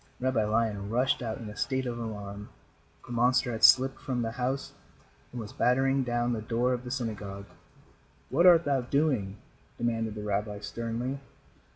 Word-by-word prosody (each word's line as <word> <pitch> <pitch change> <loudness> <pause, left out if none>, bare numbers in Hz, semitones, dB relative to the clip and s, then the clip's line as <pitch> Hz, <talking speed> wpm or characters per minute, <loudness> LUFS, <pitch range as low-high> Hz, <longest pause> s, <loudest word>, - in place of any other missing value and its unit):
Rabbi 130 -3 +1
Lion 105 -2 0
rushed 125 +5 +1
out 110 -2 -3
in 115 - -8
a 105 - -8
state 130 +4 -1
of 120 -1 -3
alarm. 105 -2 -6 0.6
The - - -10
monster 125 +1 +2
had 110 - -5
slipped 130 +1 +6
from 125 -3 -2
the 115 - -2
house 130 +3 -3 0.6
and 125 - -6
was 105 -2 -7
battering 135 +2 +2
down 120 0 0
the 110 - -3
door 120 +3 0
of 125 0 -3
the 125 - -7
synagogue. 105 -6 -4 0.9
"What 170 +7 +5
art 170 -2 +7
thou 140 -2 +2
doing?" 125 -7 0 0.4
demanded 115 -2 -1
the 105 - -6
rabbi, 105 0 -2
sternly. 115 +5 -3
120 Hz, 170 wpm, -29 LUFS, 110-130 Hz, 0.9 s, art